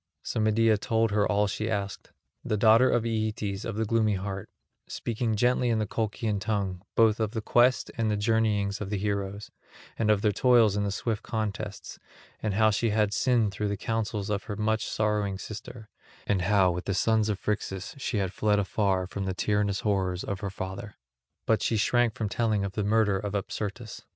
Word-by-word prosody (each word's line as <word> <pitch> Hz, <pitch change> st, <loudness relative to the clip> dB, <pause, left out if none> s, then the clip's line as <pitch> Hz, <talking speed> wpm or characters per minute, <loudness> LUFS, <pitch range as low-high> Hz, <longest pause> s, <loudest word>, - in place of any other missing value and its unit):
So 115 Hz, -, -3 dB
Medea 110 Hz, 0 st, +3 dB
told 115 Hz, 0 st, +1 dB
her 105 Hz, 0 st, +2 dB
all 105 Hz, 0 st, +3 dB
she 110 Hz, +2 st, -2 dB
asked—the 100 Hz, +1 st, -5 dB
daughter 115 Hz, +4 st, +6 dB
of 115 Hz, -, +1 dB
Aeetes 110 Hz, -3 st, -2 dB
of 115 Hz, -, -4 dB
the 110 Hz, +1 st, 0 dB
gloomy 110 Hz, -1 st, +2 dB
heart, 95 Hz, 0 st, -5 dB, 0.4 s
speaking 115 Hz, -1 st, -2 dB
gently 125 Hz, +2 st, +2 dB
in 115 Hz, -, +2 dB
the 110 Hz, -, 0 dB
Colchian 110 Hz, 0 st, -2 dB
tongue, 100 Hz, -4 st, -2 dB
both 110 Hz, -1 st, +4 dB
of 110 Hz, -1 st, -1 dB
the 115 Hz, -, -1 dB
quest 120 Hz, +4 st, +3 dB
and 110 Hz, -1 st, +1 dB
the 105 Hz, -, 0 dB
journeyings 105 Hz, -2 st, +1 dB
of 100 Hz, -, -4 dB
the 105 Hz, -, -1 dB
heroes, 100 Hz, 0 st, -3 dB, 0.5 s
and 110 Hz, -, +1 dB
of 105 Hz, -1 st, +3 dB
their 105 Hz, -, +4 dB
toils 115 Hz, -3 st, +4 dB
in 105 Hz, -, 0 dB
the 100 Hz, -, -1 dB
swift 105 Hz, +2 st, -2 dB
contests, 105 Hz, -2 st, -4 dB, 0.4 s
and 105 Hz, -3 st, -1 dB
how 110 Hz, 0 st, +4 dB
she 115 Hz, +2 st, +1 dB
had 105 Hz, -1 st, +1 dB
sinned 120 Hz, -5 st, +2 dB
through 105 Hz, +2 st, -2 dB
the 100 Hz, 0 st, -2 dB
counsels 110 Hz, -1 st, -2 dB
of 100 Hz, -1 st, -2 dB
her 105 Hz, -, -4 dB
much 110 Hz, +1 st, 0 dB
sorrowing 105 Hz, -2 st, 0 dB
sister, 110 Hz, +2 st, -8 dB, 0.4 s
and 100 Hz, -3 st, +1 dB
how 95 Hz, 0 st, +3 dB
with 90 Hz, +1 st, -4 dB
the 100 Hz, -, -1 dB
sons 110 Hz, +1 st, +2 dB
of 105 Hz, -, 0 dB
Phrixus 95 Hz, -2 st, -3 dB
she 130 Hz, -4 st, -2 dB
had 95 Hz, -2 st, -1 dB
fled 105 Hz, -1 st, +2 dB
afar 100 Hz, -2 st, 0 dB
from 95 Hz, +1 st, -5 dB
the 95 Hz, -1 st, -2 dB
tyrannous 105 Hz, 0 st, 0 dB
horrors 95 Hz, -3 st, 0 dB
of 100 Hz, -1 st, -4 dB
her 100 Hz, -1 st, -3 dB
father; 95 Hz, +2 st, -6 dB, 0.5 s
but 110 Hz, -, +2 dB
she 115 Hz, -, +1 dB
shrank 120 Hz, +1 st, +2 dB
from 110 Hz, -, -2 dB
telling 105 Hz, -1 st, 0 dB
of 100 Hz, -, -3 dB
the 105 Hz, +2 st, -2 dB
murder 105 Hz, -1 st, +2 dB
of 105 Hz, 0 st, -4 dB
Apsyrtus. 105 Hz, +3 st, -4 dB
105 Hz, 195 wpm, -27 LUFS, 100-110 Hz, 0.5 s, daughter